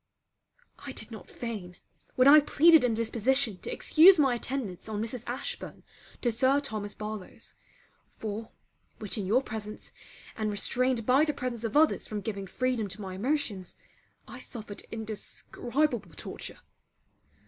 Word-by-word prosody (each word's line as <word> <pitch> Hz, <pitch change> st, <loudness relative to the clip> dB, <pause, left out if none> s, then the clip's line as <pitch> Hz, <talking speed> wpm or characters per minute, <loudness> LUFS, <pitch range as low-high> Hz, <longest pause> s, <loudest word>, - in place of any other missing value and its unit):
I 280 Hz, -2 st, -7 dB
did 220 Hz, -1 st, -3 dB
not 220 Hz, -, -10 dB
feign 205 Hz, -7 st, -6 dB, 0.4 s
when 255 Hz, +1 st, +5 dB
I 300 Hz, +2 st, +10 dB
pleaded 315 Hz, +1 st, +6 dB
indisposition 230 Hz, -1 st, +1 dB
to -, -, -6 dB
excuse 355 Hz, +4 st, +7 dB
my 270 Hz, -5 st, +4 dB
attendance 235 Hz, -6 st, -4 dB
on 210 Hz, -1 st, -3 dB
Mrs. 230 Hz, +2 st, -4 dB
Ashburn 250 Hz, +3 st, -5 dB, 0.4 s
to 240 Hz, -, +2 dB
Sir 260 Hz, +5 st, +3 dB
Thomas 215 Hz, -7 st, -4 dB
Barlowe's; 215 Hz, -2 st, -7 dB, 0.6 s
for, 215 Hz, +1 st, -5 dB, 0.5 s
which 210 Hz, +1 st, -4 dB
in 195 Hz, -, -3 dB
your 245 Hz, +7 st, +3 dB
presence 215 Hz, -2 st, -7 dB, 0.4 s
and 215 Hz, -1 st, -1 dB
restrained 240 Hz, +3 st, 0 dB
by 260 Hz, +5 st, +5 dB
the 300 Hz, -1 st, 0 dB
presence 240 Hz, -2 st, -4 dB
of 230 Hz, +4 st, 0 dB
others 315 Hz, 0 st, +3 dB
from 210 Hz, -1 st, -4 dB
giving 200 Hz, -1 st, -4 dB
freedom 250 Hz, -1 st, -1 dB
to 195 Hz, +2 st, -6 dB
my 190 Hz, -2 st, -6 dB
emotions, 210 Hz, -, -2 dB, 0.5 s
I -, -, -9 dB
suffered 215 Hz, -4 st, -7 dB
indescribable 225 Hz, -, -2 dB
torture. -, -, -7 dB
230 Hz, 140 wpm, -29 LUFS, 210-265 Hz, 0.6 s, I